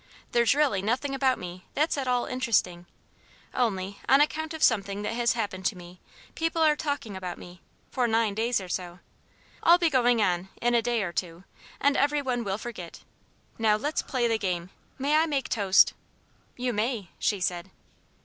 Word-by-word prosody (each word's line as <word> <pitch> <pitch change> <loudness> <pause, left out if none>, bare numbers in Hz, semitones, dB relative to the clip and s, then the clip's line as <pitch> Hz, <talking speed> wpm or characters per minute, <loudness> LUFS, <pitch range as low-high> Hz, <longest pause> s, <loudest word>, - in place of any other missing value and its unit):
There's 235 +2 +3
really 280 -10 +2
nothing 250 +7 -1
about 265 -1 +2
me 180 0 -8
that's 305 +3 +1
at 275 -3 -3
all 245 -1 +1
interesting; 190 -9 0 0.7
only, 200 -5 -1
on 270 - +7
account 310 +1 +1
of 320 -1 -4
something 200 -2 +2
that 210 - -2
has 235 0 +2
happened 200 -5 -3
to 200 - -3
me, 175 0 -12 0.3
people 330 0 -1
are 305 -1 +5
talking 285 -9 -3
about 180 -2 -5
me 175 0 -12 0.3
for 250 -2 +1
nine 225 -2 +1
days 230 +3 0
or 190 - -8
so. 175 -1 -4 0.6
I'll 340 +1 +6
be 340 -2 +1
going 245 -3 +3
on, 185 -2 0
in 240 0 +1
a 235 - +4
day 235 -2 0
or 175 -3 -4
two, 175 0 -4 0.4
and 285 0 +3
every 290 +1 +2
one 245 -3 -1
will 195 -2 -2
forget. 210 -7 -8 0.6
Now 220 -2 +4
let's 295 +8 -1
play 245 -3 -1
the 225 -1 0
game. 180 -2 -3 0.3
May 280 +3 +1
I 320 +1 +3
make 280 -4 -2
toast?" 200 -5 +4 0.6
"You 250 0 -1
may," 215 -3 -2
she 205 - 0
said. 180 0 -2
230 Hz, 185 wpm, -27 LUFS, 190-265 Hz, 0.7 s, on